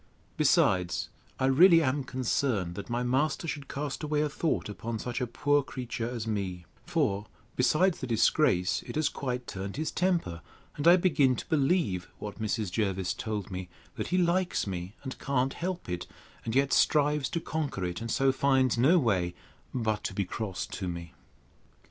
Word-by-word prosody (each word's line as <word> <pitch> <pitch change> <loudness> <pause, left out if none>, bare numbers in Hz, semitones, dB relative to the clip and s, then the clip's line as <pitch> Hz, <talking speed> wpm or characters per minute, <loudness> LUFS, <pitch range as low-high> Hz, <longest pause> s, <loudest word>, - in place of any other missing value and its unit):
Besides, 90 -3 +2 0.3
I 130 - +2
really 165 +5 +7
am 140 +1 0
concerned, 125 -7 -1
that 100 +5 -7
my 120 +1 -1
master 140 +6 0
should 145 -3 -4
cast 145 -1 -4
away 150 -1 0
a 150 - +1
thought 160 +2 -1
upon 110 +2 -4
such 120 +2 -4
a 125 - 0
poor 145 +4 +2
creature 125 -3 -4
as 120 -3 -4
me; 95 -5 -3 0.2
for, 130 - 0 0.3
besides 160 +8 +3
the 130 - -4
disgrace, 95 - +2
it - - -6
has 155 -1 +2
quite 125 -2 -4
turned 95 +4 -6
his 155 +1 -2
temper; 170 - 0 0.3
and 145 +2 0
I 175 - +9
begin 145 -8 +3
to - - -7
believe 140 - +1
what 105 +1 -7
Mrs. 110 -2 -1
Jervis 95 -3 0
told 105 -4 -4
me, 90 -1 -5 0.2
that - - -4
he 180 - +1
likes 180 +1 +1
me, 95 +1 -5
and 130 -1 -6
can't 135 -1 0
help 180 +1 -4
it; 90 -1 -4 0.4
and 115 +1 -2
yet 135 0 +3
strives 150 -2 +3
to 170 - -1
conquer 150 - -3
it; 90 +3 -4
and 115 - -4
so 135 +3 +3
finds 130 -3 +2
no 150 +9 +6
way 95 - +1 0.4
but 110 -4 -1
to 100 - -3
be 100 - 0
cross 100 -1 -4
to 95 - -5
me. 85 -1 -6
125 Hz, 180 wpm, -29 LUFS, 100-150 Hz, 0.4 s, I